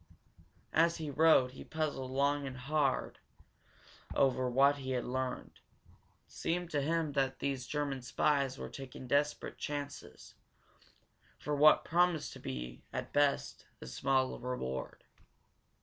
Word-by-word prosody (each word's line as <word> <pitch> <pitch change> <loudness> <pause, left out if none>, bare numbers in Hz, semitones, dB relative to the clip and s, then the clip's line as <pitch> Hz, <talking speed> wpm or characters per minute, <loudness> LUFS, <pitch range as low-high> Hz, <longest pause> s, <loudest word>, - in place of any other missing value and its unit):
As 165 +1 +4
he 155 -3 -4
rode 145 -4 +5
he 130 - -10
puzzled 150 -5 -3
long 140 +1 +1
and 130 -1 -7
hard 140 +2 0 1.0
over 130 -1 +2
what 140 +3 +4
he 130 -1 -4
had 125 -2 -1
learned. 130 0 -4 0.7
It - - -30
seemed 175 +1 -2
to 145 - +1
him 160 +1 0
that 135 -2 0
these 135 -3 -2
German 145 -3 -2
spies 135 +1 +1
were - - -5
taking 130 -1 -8
desperate 145 +3 0
chances 145 -1 -6 1.0
for 150 - -2
what 150 +1 +6
promised 175 -2 +2
to - - -10
be, - - -6
at - - -5
best, 145 -1 +1
a - - -9
small 130 - 0
reward. 95 - -4
140 Hz, 135 wpm, -33 LUFS, 130-150 Hz, 1.0 s, what